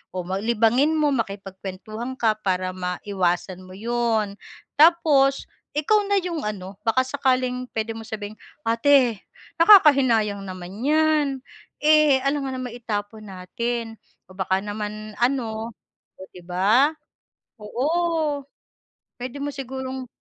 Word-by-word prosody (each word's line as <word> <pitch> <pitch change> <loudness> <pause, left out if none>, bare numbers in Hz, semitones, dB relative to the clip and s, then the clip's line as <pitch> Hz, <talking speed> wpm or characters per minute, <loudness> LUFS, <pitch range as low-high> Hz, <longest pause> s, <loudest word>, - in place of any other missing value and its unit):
o 180 - -2
ma 190 +2 -2
libangin 235 +7 +2
mo 300 -2 +2
makipagkuwentuhan 205 +1 -5
ka 215 -2 +1
para 185 -2 -1
maiwasan 180 0 -2
mo 185 - -11
'yon. 225 -2 -1 0.4
Tapos 300 -4 +4 0.3
ikaw 415 +8 +2
na 400 -1 +2
'yong 340 -6 -4
ano, 195 -2 -6
baka 260 +3 +3
sakaling 255 -2 0
puwede 225 0 -2
mo 225 - -8
sabihing, 215 0 -6 0.3
"ate 235 -1 +3 0.4
nakakahinayang 270 - +6
naman 185 -2 -8 0.2
'yan, 310 0 +3 0.6
eh, 305 -3 +5
alangan 275 -1 -1
namang 245 -1 -6
itapon 215 -1 -5
natin," 225 +4 -4 0.3
o 185 - -15
baka 190 0 0
naman 210 0 -6
ano, 235 -3 -1 0.4
o 190 - -10
'di 180 -1 -14
ba? 210 - +3 0.6
Oo, 295 +6 -1 0.7
puwede 255 +3 -6
mo 290 - -2
sigurong 265 -1 -6
235 Hz, 120 wpm, -23 LUFS, 205-275 Hz, 0.7 s, nakakahinayang